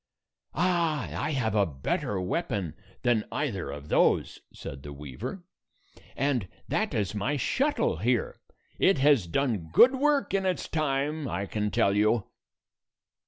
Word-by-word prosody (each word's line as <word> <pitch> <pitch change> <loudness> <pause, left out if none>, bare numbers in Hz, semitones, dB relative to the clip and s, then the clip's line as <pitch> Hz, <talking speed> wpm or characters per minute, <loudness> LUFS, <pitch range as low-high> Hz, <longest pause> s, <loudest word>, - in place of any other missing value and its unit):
130 170 -3 0
"Ah! - - -2
I - - -1
have 115 -6 0
a 100 -2 +3
better 75 +7 -2
weapon 100 - -2 0.3
than 120 -3 +3
either - - -2
of 75 +1 -8
those," - - +2
said 70 - -8
the 70 +1 -8
weaver, 70 - -7 0.7
"and 130 -7 0 0.2
that - - -1
is 100 -2 -1
my 120 +8 -1
shuttle 280 - +1
here. - - 0 0.4
It 190 - +4
has 135 -8 +4
done 105 - -1
good 250 - +7
work 285 -1 +1
in 195 -1 +2
its 185 -2 -1
time, 150 0 -1
I 100 -3 -2
can 105 +1 -2
tell 100 0 +2
you." 105 +1 +3
125 Hz, 145 wpm, -28 LUFS, 100-160 Hz, 0.7 s, good